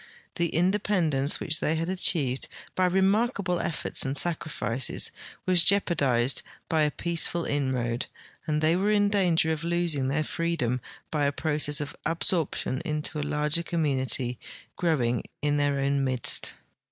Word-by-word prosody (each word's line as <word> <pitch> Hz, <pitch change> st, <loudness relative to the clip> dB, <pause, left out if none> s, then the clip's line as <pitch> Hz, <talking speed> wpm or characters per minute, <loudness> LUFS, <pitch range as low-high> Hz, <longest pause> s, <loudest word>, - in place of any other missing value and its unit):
The 170 Hz, -1 st, +1 dB
independence 175 Hz, -6 st, +1 dB
which 155 Hz, -1 st, 0 dB
they 155 Hz, -, 0 dB
had 165 Hz, +1 st, -2 dB
achieved 155 Hz, -8 st, 0 dB, 0.3 s
by 185 Hz, -, +2 dB
remarkable 190 Hz, 0 st, +1 dB
efforts 150 Hz, -, 0 dB
and 135 Hz, +1 st, -2 dB
sacrifices 150 Hz, -8 st, -1 dB, 0.3 s
was 180 Hz, -2 st, +5 dB
jeopardized 140 Hz, -10 st, +2 dB, 0.3 s
b}^ 155 Hz, -2 st, +3 dB
a -, -, 0 dB
peaceful 170 Hz, +1 st, 0 dB
inroad, 130 Hz, -4 st, -1 dB, 0.4 s
and 155 Hz, 0 st, 0 dB
they 160 Hz, +2 st, +4 dB
were 195 Hz, +3 st, +1 dB
in 205 Hz, -1 st, +3 dB
danger 175 Hz, -5 st, +2 dB
of 160 Hz, 0 st, -2 dB
losing 170 Hz, -5 st, +2 dB
their 145 Hz, +3 st, 0 dB
free 170 Hz, +2 st, -1 dB
dom 125 Hz, -4 st, -1 dB, 0.3 s
by 150 Hz, -2 st, +1 dB
a -, -, +1 dB
process 150 Hz, -1 st, +1 dB
of 145 Hz, 0 st, -5 dB
absorption 165 Hz, -5 st, -1 dB
into 150 Hz, 0 st, -2 dB
a 145 Hz, 0 st, -3 dB
larger 150 Hz, +2 st, +1 dB
community 130 Hz, -7 st, -1 dB, 0.4 s
growing 125 Hz, -9 st, 0 dB, 0.2 s
in 145 Hz, 0 st, +2 dB
their 145 Hz, -1 st, +1 dB
own 140 Hz, 0 st, +1 dB
midst. 130 Hz, -3 st, 0 dB
155 Hz, 145 wpm, -27 LUFS, 140-170 Hz, 0.4 s, was